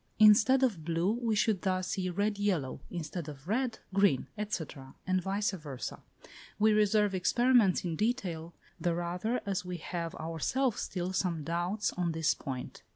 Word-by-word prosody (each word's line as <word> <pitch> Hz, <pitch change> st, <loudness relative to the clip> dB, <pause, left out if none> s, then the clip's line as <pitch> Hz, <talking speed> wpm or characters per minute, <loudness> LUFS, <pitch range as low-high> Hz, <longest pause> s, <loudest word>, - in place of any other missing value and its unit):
Instead 220 Hz, +5 st, +6 dB
of 205 Hz, -11 st, +1 dB
blue, 170 Hz, +4 st, +1 dB
we 230 Hz, -1 st, 0 dB
should 210 Hz, -2 st, +2 dB
thus 185 Hz, -1 st, 0 dB
see 185 Hz, -1 st, -1 dB
red 205 Hz, +3 st, -1 dB
yellow; 175 Hz, -11 st, 0 dB
instead 165 Hz, -1 st, -5 dB
of 145 Hz, +1 st, -11 dB
red, 235 Hz, +2 st, 0 dB, 0.2 s
green, 195 Hz, -9 st, +3 dB, 0.2 s
&c., 185 Hz, -6 st, -1 dB, 0.4 s
and 185 Hz, 0 st, +1 dB
vice 200 Hz, +3 st, 0 dB
versâ. 150 Hz, -9 st, -6 dB, 0.6 s
We 215 Hz, +1 st, +4 dB
reserve 210 Hz, -1 st, +3 dB
experiments 230 Hz, +1 st, +3 dB
in 165 Hz, -2 st, -1 dB
detail, 180 Hz, -8 st, -2 dB, 0.2 s
the 175 Hz, -2 st, 0 dB
rather 180 Hz, +8 st, -2 dB
as 195 Hz, -3 st, -1 dB
we 180 Hz, -1 st, -5 dB
have 170 Hz, 0 st, -4 dB
ourselves 200 Hz, -, -1 dB
still 180 Hz, 0 st, -3 dB
some 175 Hz, -4 st, 0 dB
doubts 175 Hz, +6 st, -1 dB
on 175 Hz, -2 st, -1 dB
this 160 Hz, -1 st, +2 dB
point. 130 Hz, -2 st, -6 dB
185 Hz, 155 wpm, -31 LUFS, 170-210 Hz, 0.6 s, Instead